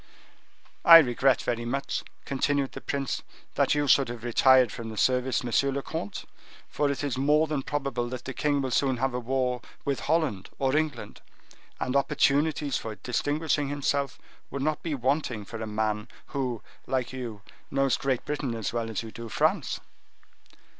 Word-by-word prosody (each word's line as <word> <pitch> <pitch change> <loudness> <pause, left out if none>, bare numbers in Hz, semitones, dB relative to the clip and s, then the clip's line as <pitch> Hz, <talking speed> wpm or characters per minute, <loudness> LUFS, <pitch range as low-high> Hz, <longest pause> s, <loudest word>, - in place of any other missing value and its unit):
"I 165 -1 +12
regret 130 -3 +3
very 120 -1 -1
much," 135 +4 -2 0.2
continued 140 0 0
the - - -8
prince, 140 -3 -2 0.3
"that - - +2
you 145 0 +1
should 135 -2 +5
have 120 -1 -7
retired 125 0 +5
from 115 -1 -6
the 110 - -8
service, 130 +2 +2
monsieur 125 +3 +2
le 140 0 -3
comte; 130 -11 -5 0.4
for 145 - 0
it 140 0 -2
is 135 -3 -1
more 150 +3 +4
than 150 -3 -2
probable 135 -4 -2
that 125 -1 -6
the 130 - -4
king 145 +1 +1
will 130 - -2
soon 130 0 +2
have 130 +1 0
a 125 - -1
war 125 0 -1 0.2
with 140 -2 0
Holland 150 - 0
or 135 0 +1
England, 155 -2 -2 0.6
and 125 - -1
opportunities 145 +1 +2
for 110 -1 -6
distinguishing 145 +4 0
himself 140 -1 -1 0.3
would 140 0 -4
not 155 0 0
be 160 -3 -2
wanting 130 -4 -1
for 115 +2 -7
a 110 - -3
man 105 0 -1 0.3
who, 130 -5 -2 0.2
like 130 -1 -1
you, 115 -6 -6 0.3
knows 135 -2 +2
Great 135 -3 -1
Britain 145 -5 -2
as 115 0 -3
well 115 -1 -2
as 110 0 -3
you 110 - -8
do 115 0 -8
France." - - +1
135 Hz, 175 wpm, -27 LUFS, 120-145 Hz, 0.6 s, I